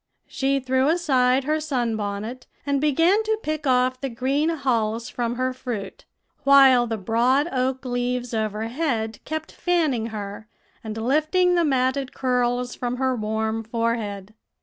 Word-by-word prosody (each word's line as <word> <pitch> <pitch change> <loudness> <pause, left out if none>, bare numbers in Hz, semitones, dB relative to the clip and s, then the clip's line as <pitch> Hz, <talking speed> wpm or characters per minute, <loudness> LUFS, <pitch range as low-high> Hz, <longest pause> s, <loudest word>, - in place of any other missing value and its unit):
"She 275 +1 0
threw 260 +1 +1
aside 270 -6 +2
her 305 +3 0
sun 250 -7 -1
bonnet, 215 +4 -5 0.2
and 280 -1 0
began 330 +8 +3
to 440 0 0
pick 310 -1 -3
off 255 0 +2
the 270 - -2
green 270 +6 0
hulls 235 -6 -1
from 240 -1 -2
her 255 +1 -1
fruit, 240 -6 -6 0.4
while 270 -3 +6
the 225 -1 -2
broad 240 - +2
oak 260 0 -1
leaves 245 0 -2
overhead 220 +2 -2
kept 315 0 -4
fanning 310 -11 0
her, 210 0 -7 0.4
and 220 -1 -6
lifting 310 +10 +2
the 345 -1 +3
matted 265 -2 0
curls 245 -1 0
from 245 0 -3
her 260 0 0
warm 220 0 -2
forehead. 220 -3 -3
255 Hz, 145 wpm, -23 LUFS, 230-275 Hz, 0.4 s, while